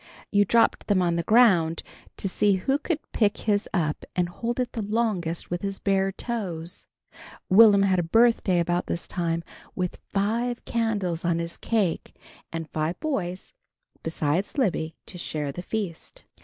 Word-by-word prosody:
You 205 0 +4
dropped 230 +4 +2
them 205 -3 +3
on 170 -1 +1
the 170 - +1
ground 175 -6 +4 0.3
to - - -1
see 200 +2 +2
who 265 +10 0
could 330 0 -1
pick 210 -2 +2
his 205 -1 0
up 155 -6 -1
and 175 -1 +1
hold 235 +7 -3
it 250 -1 -1
the 230 - -4
longest 205 -7 -1
with 175 0 -2
his 195 -1 -3
bare 195 -1 +1
toes. 185 -7 -5 0.6
Will'm 200 0 +8
had 190 -2 +3
a - - +3
birthday 225 +1 +3
about 175 +1 0
this 170 - -3
time, 170 -2 -2 0.3
with 180 -1 -3
five 230 +5 -1
candles 205 -8 -1
on 170 -1 +1
his 170 0 -3
cake 205 -7 -1 0.4
and 165 -1 -4
five 155 +2 -2
boys, 190 - -3 0.5
besides 160 - -1
Libby, 170 - 0
to 180 - -9
share 150 -4 -3
the 175 - -6
feast. 190 -4 -5
190 Hz, 160 wpm, -26 LUFS, 170-220 Hz, 0.6 s, Will'm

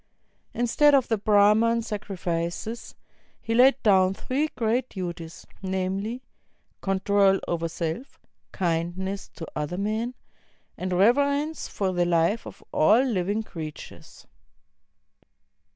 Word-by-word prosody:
Instead 280 +5 +4
of 265 -3 +2
the 225 - +2
Brahman 215 +3 +4
sacrifices, 195 0 -4 0.4
he 225 - -3
laid 255 +4 +6
down 190 -2 +4
three 280 +8 -1
great 240 +2 0
duties, 170 -3 -7 0.2
namely, 195 +6 -3 0.6
control 195 0 +2
over 165 -1 -1
self, 165 - -5 0.3
kindness 180 +3 -2
to 165 - -6
other 150 +4 -3
men, 220 +5 -2 0.6
and 185 0 -4
reverence 280 - +2
for 190 -2 -2
the 175 -1 +1
life 175 +6 +1
of - - -12
all 210 +8 +5
Uving 210 -1 -1
creatures. 155 -6 -9
200 Hz, 105 wpm, -25 LUFS, 180-230 Hz, 0.6 s, laid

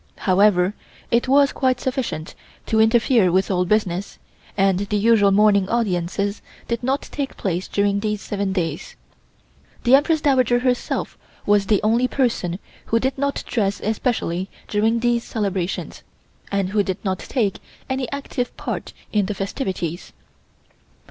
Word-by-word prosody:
However, 190 -1 +3 0.4
it 235 +2 +2
was 280 +1 +5
quite 255 -2 +1
sufficient 245 - -3 0.3
to 220 - +1
interfere 225 -3 +4
with 190 +3 +1
all 180 -1 +1
business, 195 -1 -1 0.4
and 195 -2 +3
the 205 +1 -1
usual 210 -1 +4
morning 200 -1 +4
audiences 200 -2 -1 0.3
did 235 -1 -2
not 265 +3 0
take 280 -2 -4
place 180 -1 -2
during 200 0 +1
these 210 0 -2
seven 200 -1 -3
days. 165 -5 -3 0.9
The 245 - +3
Empress 305 +3 +5
Dowager 255 -4 +3
herself 250 0 -1 0.3
was 205 -1 +3
the 210 0 +2
only 230 +4 +3
person 235 -10 0 0.3
who 230 - +1
did 265 +3 -1
not 280 +1 -2
dress 205 -4 -1
especially 205 -5 -1 0.2
during 225 +2 +1
these 240 -1 +1
celebrations, 195 -4 -3 0.5
and 200 -2 0
who 205 +1 +2
did 190 -2 -2
not 185 -1 -1
take 215 -7 -1 0.3
any 260 -2 -2
active 280 -3 -4
part - - -5 0.2
in 205 -3 +2
the 210 - -3
festivities. 190 - -4
210 Hz, 140 wpm, -22 LUFS, 195-245 Hz, 0.9 s, was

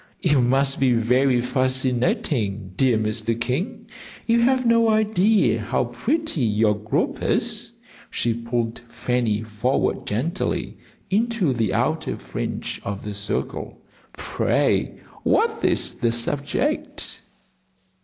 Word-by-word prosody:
"You 150 -6 +4
must 135 +3 +3
be 130 -2 +4
very 125 +2 +3
fascinating, 125 - 0
dear 125 -1 +3
Mr. 110 +1 -1
King; 185 - -2 0.4
you 230 0 +3
have 255 +1 +3
no 230 -1 +4
idea 215 - +3
how 115 +4 0
pretty 175 - -1
your 110 -2 +3
group 105 +1 -2
is." - - -1 0.4
She 120 - 0
pulled 115 0 -2
Fanny 120 -3 -1
forward 110 +4 -1
gently 140 - -2 0.3
into 215 - +1
the 110 -5 0
outer 155 +7 0
fringe - - -5
of 100 0 -5
the 105 - -5
circle. 100 +1 -4 0.3
"Pray, - - 0 0.2
what - - +1
is - - +2
the 115 - 0
subject?" 135 +5 -2
125 Hz, 115 wpm, -23 LUFS, 115-165 Hz, 0.4 s, You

